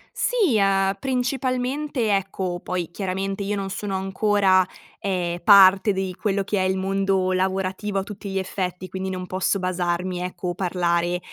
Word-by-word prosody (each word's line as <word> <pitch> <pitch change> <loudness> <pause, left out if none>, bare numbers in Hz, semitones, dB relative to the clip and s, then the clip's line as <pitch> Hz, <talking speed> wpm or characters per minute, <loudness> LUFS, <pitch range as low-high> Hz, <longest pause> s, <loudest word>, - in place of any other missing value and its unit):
Sì, 400 - +2
uhm, 195 -1 +2
principalmente, 255 -1 -1
ecco 190 -2 -2
poi 180 -2 -3
chiaramente 195 +2 -3
io 205 +1 -1
non 195 -1 -3
sono 195 0 -3
ancora, 195 0 +3 0.4
ehm, 175 -3 -2
parte 195 +1 +7
di 190 -1 -2
quello 200 -2 0
che 200 +1 -1
è 185 - +1
il 190 - 0
mondo 190 -1 0
lavorativo 190 +2 -1
a - - -3
tutti 200 0 -8
gli 195 - -1
effetti, 185 -1 -4
quindi 190 0 -4
non 185 -1 -4
posso 190 +2 0
basarmi, 180 0 -1
ecco, 180 0 -4
o 175 - -2
parlare, 175 -1 0
190 Hz, 160 wpm, -23 LUFS, 185-200 Hz, 0.4 s, parte